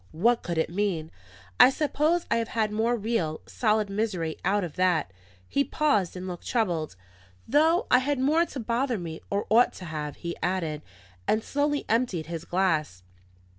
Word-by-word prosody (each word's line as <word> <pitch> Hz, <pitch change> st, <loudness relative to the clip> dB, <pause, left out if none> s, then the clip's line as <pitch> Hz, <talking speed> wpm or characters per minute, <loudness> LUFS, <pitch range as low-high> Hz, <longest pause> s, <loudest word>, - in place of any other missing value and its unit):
What 230 Hz, +9 st, +2 dB
could 170 Hz, -2 st, -4 dB
it 160 Hz, 0 st, 0 dB
mean? 175 Hz, -5 st, -1 dB, 0.5 s
I 250 Hz, -, +10 dB
suppose 305 Hz, +4 st, +1 dB
I 230 Hz, -, +4 dB
have 230 Hz, -1 st, -1 dB
had 220 Hz, -2 st, -1 dB
more 225 Hz, +3 st, +1 dB
real, 205 Hz, -9 st, -2 dB
solid 215 Hz, -2 st, +1 dB
misery 195 Hz, -6 st, -2 dB
out 200 Hz, +2 st, +1 dB
of 170 Hz, -4 st, -6 dB
that 175 Hz, -, +1 dB, 0.2 s
..." -, -, -27 dB
He 280 Hz, -, +1 dB
paused, 280 Hz, -, +1 dB
and 185 Hz, +1 st, -6 dB
looked 175 Hz, -2 st, -7 dB
troubled. 175 Hz, -, -1 dB, 0.5 s
"Though 320 Hz, -, +3 dB
I 250 Hz, -, +7 dB
had 285 Hz, +2 st, 0 dB
more 295 Hz, +6 st, +3 dB
to 275 Hz, -, -7 dB
bother 240 Hz, +2 st, 0 dB
me, 165 Hz, -3 st, -6 dB
or 200 Hz, +1 st, -1 dB
ought 235 Hz, +3 st, +5 dB
to 185 Hz, -, -9 dB
have," 150 Hz, -2 st, -5 dB
he 170 Hz, -1 st, -5 dB
added, 165 Hz, -5 st, -1 dB, 0.5 s
and 215 Hz, +1 st, +2 dB
slowly 290 Hz, 0 st, 0 dB
emptied 225 Hz, -8 st, 0 dB
his 165 Hz, 0 st, -6 dB
glass. 160 Hz, -, 0 dB
205 Hz, 175 wpm, -27 LUFS, 170-245 Hz, 0.5 s, I